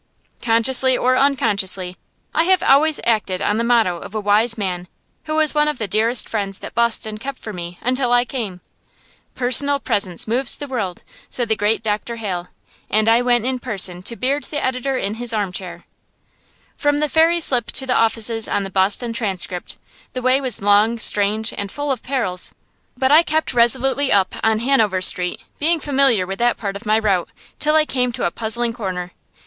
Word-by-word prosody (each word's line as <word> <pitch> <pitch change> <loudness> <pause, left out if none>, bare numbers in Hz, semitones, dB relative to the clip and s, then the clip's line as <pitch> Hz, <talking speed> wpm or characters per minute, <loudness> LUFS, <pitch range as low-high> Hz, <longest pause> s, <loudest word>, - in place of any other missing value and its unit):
Consciously 250 +3 +3
or 255 +1 +1
unconsciously, 200 -9 +1 0.4
I 325 - +2
have 375 0 +2
always 295 +3 +3
acted 210 -5 0
on 210 +2 -1
the - - 0
motto 230 -7 +2
of 210 - -11
a - - -1
wise 215 +3 +2
man 180 -3 -4 0.4
who 310 - -3
was 310 -1 +2
one 300 0 +2
of 300 - -1
the 220 - -3
dearest 225 +5 +2
friends 200 -3 -2
that - - -9
Boston 225 -2 0
kept 275 +3 -6
for 215 - -8
me 175 -1 -7
until 255 0 0
I 245 0 +3
came. 215 -9 -6 0.7
"Personal 280 +3 +2
presence 195 -8 -1
moves 245 +4 +1
the 290 - -6
world," 210 -10 -5 0.3
said 240 -2 -3
the 220 - +2
great 215 +2 0
Dr. 215 +2 -3
Hale; 185 -6 -5 0.4
and 215 +1 +1
I 230 +2 +4
went 245 -2 +1
in 255 0 -1
person 195 -7 -1
to 220 +5 -1
beard 275 +4 -1
the 295 - -4
editor 260 +1 -2
in 200 -4 -3
his 240 -1 0
armchair. 185 -4 -4 0.9
From 290 -1 0
the 300 +1 0
ferry 325 +3 +2
slip 250 -8 +1
to 265 - 0
the 255 - 0
offices 225 0 +1
of 200 - -1
the 195 - -7
"Boston 200 +5 +1
Transcript" 190 -5 -3 0.4
the 255 - -5
way 255 +2 +2
was 255 -6 -1
long, 205 +3 +3
strange, 215 0 +2
and 200 -1 -5
full 290 -1 -3
of 255 -4 -3
perils; 230 -9 -2 0.4
but 260 +1 +1
I 310 +2 +8
kept 315 -1 -1
resolutely 260 +4 +2
on 200 - +5
up 185 - -8
Hanover 220 -3 +1
Street, 180 -1 +2 0.2
being 325 +3 +2
familiar 270 -9 +2
with 195 +1 -6
that 240 0 +1
part 200 -2 -5
of 210 +2 -9
my 215 +1 +3
route, 200 -5 0 0.3
till 305 +1 +1
I 310 -1 +4
came 250 -4 -1
to - - -3
a 175 - 0
puzzling 230 +2 0
corner. 185 -6 -5
230 Hz, 190 wpm, -19 LUFS, 200-260 Hz, 0.9 s, I